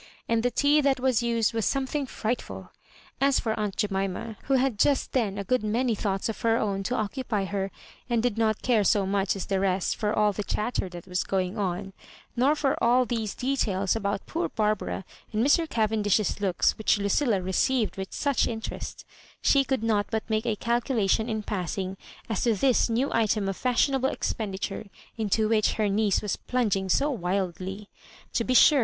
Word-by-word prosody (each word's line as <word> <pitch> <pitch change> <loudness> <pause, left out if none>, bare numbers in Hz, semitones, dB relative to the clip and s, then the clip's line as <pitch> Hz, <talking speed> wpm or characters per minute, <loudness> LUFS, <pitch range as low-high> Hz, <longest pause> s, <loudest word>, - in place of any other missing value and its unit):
And 230 -1 +2
the 245 - +2
tea 285 +5 +3
that 275 -2 +2
was 255 -2 +2
used 230 -2 +1
was 225 -1 -1
something 275 +2 -1
frightful 240 0 -4 0.5
As 275 0 +4
for 220 - -1
aunt 210 -2 -2
Jemima^ 195 +2 -2
who 270 - +2
had 260 -5 +1
just 280 +2 +2
then 215 -6 0
a 200 - -2
good 250 +3 0
many 230 +3 +1
thoughts 195 -2 -1
of 225 - -5
her 230 0 +3
own 200 -3 -1
to 250 - 0
occupy 215 -2 -2
her, 195 0 -2 0.4
and 235 -2 +1
did 245 -4 +1
not 220 -2 0
care 235 -4 +3
so 200 0 +3
much 195 0 0
as 195 - -4
the 195 -1 0
rest 190 -1 0
for 210 -2 -1
all 210 -1 +2
the 210 - -3
chatter 210 -2 -2
that 175 -1 -9
was 180 0 -1
going 185 0 -1
on, 195 0 -2 0.4
nor 265 +5 +3
for 280 -3 0
aU 245 +2 +4
those 225 -4 -3
de 270 +2 -1
tails 195 -6 0
about 200 -2 -2
poor 335 +2 -2
Barbara 210 -3 -1 0.3
and 220 +3 +1
Mr. 320 +3 +3
Cavendish's 215 -2 +1
looks 190 0 +1
which 220 - +3
Lucilla 205 +2 +1
received 210 +6 0
with 190 0 -6
such 280 -3 +1
interest, 225 -1 -6 0.3
she 275 -1 +4
could 265 -4 -1
not 210 -3 +1
but 220 -1 -2
make 220 +1 -1
a 220 - +1
calculation 230 -1 +1
in 215 -1 -2
passing 190 -1 -3 0.3
as 220 -4 -2
to 230 -3 +2
this 250 +3 +3
new 240 +5 0
item 215 -2 +1
of 195 - -2
fashionable 260 +3 +1
expenditure 200 0 -3 0.3
into 220 0 +1
which 215 -1 +2
her 215 -1 0
niece 205 0 +1
wa& - - -4 0.2
plung^ing 205 -6 +1
so 285 +10 +2
wildly. 190 - -3 0.5
To 230 - +1
be 255 +2 0
sure. 290 +3 +7
220 Hz, 190 wpm, -27 LUFS, 200-245 Hz, 0.5 s, sure